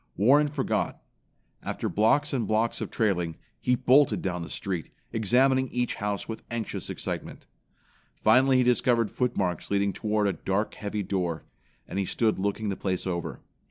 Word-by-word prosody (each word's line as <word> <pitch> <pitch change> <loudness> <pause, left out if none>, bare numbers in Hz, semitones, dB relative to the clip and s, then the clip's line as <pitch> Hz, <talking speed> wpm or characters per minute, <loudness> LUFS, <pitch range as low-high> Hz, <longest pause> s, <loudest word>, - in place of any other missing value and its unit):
Warren 140 +8 +5
forgot. 145 - -1 0.6
After - - -3
blocks 140 +8 +2
and 125 -4 0
blocks 110 +2 +1
of - - -3
trailing, 90 -7 0 0.2
he 125 - +2
bolted 135 +3 +4
down 90 -2 -2
the 85 - -6
street, 95 -5 -4 0.2
examining 130 +4 +3
each 125 -1 -1
house 105 -1 -2
with 110 - -5
anxious 115 -2 -4
excitement. - - -5 0.8
Finally 130 0 +5
he 130 - +4
discovered 120 -2 +2
footmarks 100 -9 -1
leading 100 -1 +1
toward 105 -1 0
a 100 - +1
dark, 100 +3 -1
heavy 105 0 -3
door, 90 -5 -2 0.4
and 100 - -3
he 100 - 0
stood 110 +1 0
looking 100 +2 -1
the 100 - -1
place 95 -2 -2
over. 85 -2 -3
110 Hz, 160 wpm, -27 LUFS, 95-125 Hz, 0.8 s, Warren